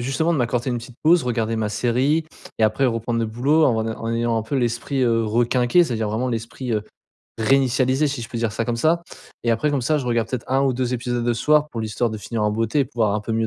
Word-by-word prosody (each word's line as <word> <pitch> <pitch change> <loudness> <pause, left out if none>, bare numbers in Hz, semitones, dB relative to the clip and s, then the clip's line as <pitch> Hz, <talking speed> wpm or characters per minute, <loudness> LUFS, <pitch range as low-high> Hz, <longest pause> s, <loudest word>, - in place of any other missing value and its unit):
justement 150 +6 0
de 160 - 0
m'accorder 120 +1 0
une 120 - -1
petite 120 +1 -12
pause 170 +2 +5
regarder 115 -2 -1
ma 110 -1 -1
série 130 +8 +1 0.3
et 110 - +4
après 120 +5 +2
reprendre 115 0 -1
le 115 - 0
boulot 140 +8 +2
en 110 -3 +1
ay 110 - -2
en 115 +1 -4
ayant 115 0 0
un 110 - 0
peu 125 +6 -3
l'esprit, 120 +2 -1
heu, 115 -1 +2
requinqué 120 +8 +3
c'est-à-dire 115 -6 -2
vraiment 115 +4 -1
l'esprit, 115 +1 -4
heu, 105 - 0 0.5
réinitialisé 130 +3 +2
si 135 -4 -4
je 115 - -8
peux 120 - -4
dire 115 -1 0
ça 115 - -2
comme 120 0 -2
ça. 165 +6 +2 0.4
Et 120 - +1
après 115 +6 +1
comme 140 -3 0
ça 150 +4 +1
je 130 - -4
regarde 115 -2 +1
peut-être 130 -1 -5
1 135 +1 +3
ou 135 -2 +2
2 125 0 -1
épisodes 120 0 -2
le 120 - +2
soir 150 +4 +2
pour 115 -5 -5
l'histoire 110 +2 -1
de 110 - -5
finir 110 +1 -4
en 105 - +2
beauté 115 +6 0
et - - +3
pouvoir 110 -6 0
un 105 - -1
peu 115 - -4
mieux 110 0 +1
120 Hz, 265 wpm, -22 LUFS, 115-135 Hz, 0.5 s, pause